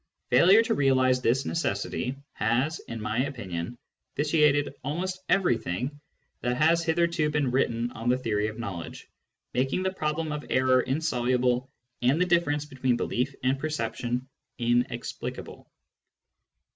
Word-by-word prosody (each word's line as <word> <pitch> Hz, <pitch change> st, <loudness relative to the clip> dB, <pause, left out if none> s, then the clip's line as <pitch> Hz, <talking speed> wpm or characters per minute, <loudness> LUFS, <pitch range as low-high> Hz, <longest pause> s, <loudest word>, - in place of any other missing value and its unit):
Failure 185 Hz, -, +7 dB
to -, -, 0 dB
realise 130 Hz, -2 st, +3 dB
this 125 Hz, +2 st, +1 dB
necessity 125 Hz, -2 st, -2 dB, 0.2 s
has, 125 Hz, +9 st, 0 dB
in 115 Hz, -, -7 dB
my 105 Hz, +2 st, -2 dB
opinion, 100 Hz, -6 st, -5 dB, 0.4 s
vitiated 150 Hz, -1 st, +3 dB
almost 180 Hz, +7 st, -3 dB
everything 135 Hz, -, 0 dB, 0.4 s
that 125 Hz, +1 st, 0 dB
has 165 Hz, +3 st, +4 dB
hitherto 170 Hz, -1 st, +1 dB
been 145 Hz, -4 st, 0 dB
written 120 Hz, -2 st, 0 dB
on 115 Hz, +2 st, -3 dB
the 125 Hz, -, +3 dB
theory 110 Hz, -4 st, 0 dB
of 110 Hz, -, -6 dB
knowledge, 95 Hz, -8 st, -6 dB, 0.5 s
making 135 Hz, +8 st, 0 dB
the 190 Hz, 0 st, 0 dB
problem 155 Hz, -2 st, -2 dB
of 150 Hz, 0 st, -4 dB
error 130 Hz, 0 st, +4 dB
insoluble 125 Hz, -3 st, 0 dB, 0.3 s
and 130 Hz, +6 st, +3 dB
the 180 Hz, -, +4 dB
difference 160 Hz, -4 st, +1 dB
between 130 Hz, -4 st, 0 dB
belief 130 Hz, +4 st, -1 dB
and 130 Hz, +1 st, +1 dB
perception 125 Hz, -3 st, -2 dB, 0.3 s
inexplicable. 120 Hz, 0 st, -2 dB
130 Hz, 130 wpm, -27 LUFS, 120-150 Hz, 0.5 s, Failure